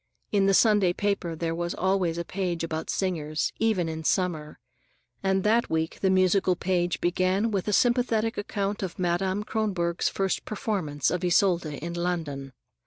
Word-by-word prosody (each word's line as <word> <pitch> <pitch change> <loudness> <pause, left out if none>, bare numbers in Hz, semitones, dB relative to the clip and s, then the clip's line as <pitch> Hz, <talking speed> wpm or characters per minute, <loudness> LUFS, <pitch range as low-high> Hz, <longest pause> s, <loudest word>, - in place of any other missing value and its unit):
In 200 -2 +3
the 195 - +4
Sunday 205 -5 +4
paper 195 -4 -1
there 165 0 -2
was 175 +1 -3
always 185 -3 0
a 170 - -3
page 180 -3 -2
about 160 -1 -4
singers, 155 -5 -1
even 215 -6 +1
in 160 0 -5
summer, 160 -4 -1 0.6
and 190 -1 +1
that 225 +3 +2
week 160 0 -1
the 190 - +2
musical 185 0 +3
page 175 -2 0
began 185 +5 +1
with 195 -2 -1
a - - +1
sympathetic 230 -1 +2
account 205 0 -3
of 185 -3 -4
Madame 185 +3 0
Kronborg's 190 -6 -1
first 195 -1 -1
performance 170 - -2
of 180 0 -2
Isolde 175 -4 +2
in 170 +4 -5
London. 165 -6 -3
185 Hz, 160 wpm, -27 LUFS, 170-200 Hz, 0.6 s, the